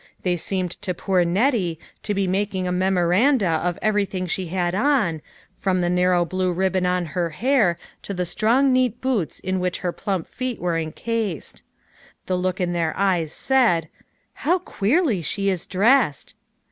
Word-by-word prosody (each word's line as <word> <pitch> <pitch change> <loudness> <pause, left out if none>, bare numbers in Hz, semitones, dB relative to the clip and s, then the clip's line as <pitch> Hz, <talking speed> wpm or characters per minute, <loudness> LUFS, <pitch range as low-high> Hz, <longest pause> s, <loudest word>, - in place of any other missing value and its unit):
They 180 -1 +1
seemed 180 +1 -3
to 185 -3 -3
poo; 185 0 +1
Nettie 185 - +1 0.2
to 205 - -2
be 195 0 +1
mak 195 +2 -1
ing 185 -1 -1
a - - -1
memoranda 190 +6 +2 0.2
of 175 -1 -1
everything 200 -3 0
she 180 +1 -3
had 175 0 -1
on, 210 - +1 0.4
from 190 -2 +1
the 175 -1 +1
narrow 180 -1 +3
blue 185 +1 -1
ribbon 185 +1 0
on 180 -1 0
her 175 -2 0
hair 210 - +2 0.2
to - - -7
the 180 -2 -2
strong 235 +9 +2
neat 250 -2 +1
boots 245 - -1
in 185 0 -2
which 180 0 -2
her 180 - -1
plump 190 -2 -3
feet 255 -2 -4
were 170 -2 0
encased. 200 +3 -3 0.6
The 185 - -1
look 185 +1 -1
in 175 -1 0
their 165 -2 -1
eyes 180 -6 +1
said, 225 - +2 0.2
" - - -44
How 350 +5 +3
queerly 270 - 0
she 195 +5 -1
is 185 -3 -2
dressed 210 - +2
185 Hz, 170 wpm, -23 LUFS, 175-215 Hz, 0.6 s, narrow